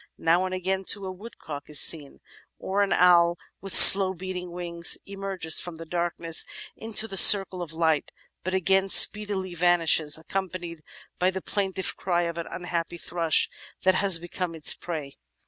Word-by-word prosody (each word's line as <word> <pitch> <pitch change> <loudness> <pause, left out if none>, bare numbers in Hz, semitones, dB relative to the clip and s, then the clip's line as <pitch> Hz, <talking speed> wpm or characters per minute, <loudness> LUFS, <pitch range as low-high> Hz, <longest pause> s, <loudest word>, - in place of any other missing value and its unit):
Now 170 +3 0
and 185 0 -6
again, 190 +1 -4
too, 200 +1 -2
a 190 - -7
woodcock 180 -8 -12
is 150 - -1
seen; 150 -4 0 0.4
or 195 +2 -4
an 200 - -2
owl 175 -1 +2 0.2
with 195 - -7
slow 190 -1 +9
beating 180 0 -8
wings, 170 -1 -2
emerges 195 -5 -3
from 175 -2 -9
the 165 +1 -11
darkness 170 -1 -1 0.3
into 220 0 -2
the 195 - -9
circle 190 -1 +7
of 170 -3 -8
light, 160 -2 -2 0.3
but 185 +1 -4
again 190 +1 -1
speedily 200 -3 +3
vanishes, 165 -3 +1
accompanied 175 -1 -8 0.4
by 180 - 0
the 190 0 -6
plaintive 190 -1 -4
cry 175 -2 -3
of 170 0 -6
an 170 - -8
unhappy 175 -1 -6
thrush 170 -1 -1 0.4
that 185 +1 +2
has 190 -2 +4
become 175 0 -7
its 155 - +5
prey." 155 -5 -9
180 Hz, 165 wpm, -23 LUFS, 165-190 Hz, 0.4 s, slow